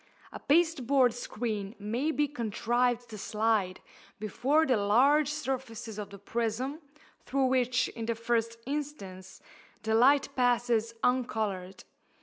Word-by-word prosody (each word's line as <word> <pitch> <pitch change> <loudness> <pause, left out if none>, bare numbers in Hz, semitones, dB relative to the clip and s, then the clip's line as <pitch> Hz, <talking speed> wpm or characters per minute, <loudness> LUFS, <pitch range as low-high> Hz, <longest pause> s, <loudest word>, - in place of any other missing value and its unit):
A - - -8
pasteboard 280 -6 +3
screen 215 -4 -4
may 230 +9 -2
be 295 -2 +1
contrived 240 -1 0
to 215 -2 -8
slide 210 -3 0 0.4
before 250 +9 +1
the 255 - +3
large 255 +9 +4
surfaces 255 -7 -4
of 205 - -6
the 200 - -10
prism, 235 +7 -2 0.5
through 270 0 +1
which, 255 -1 +2
in 225 -1 -6
the 230 - 0
first 230 0 -1
instance, 255 -11 -6 0.4
the 220 0 0
light 270 +5 +5
passes 240 -2 +1
uncoloured. 215 -7 -1
235 Hz, 125 wpm, -29 LUFS, 215-265 Hz, 0.5 s, light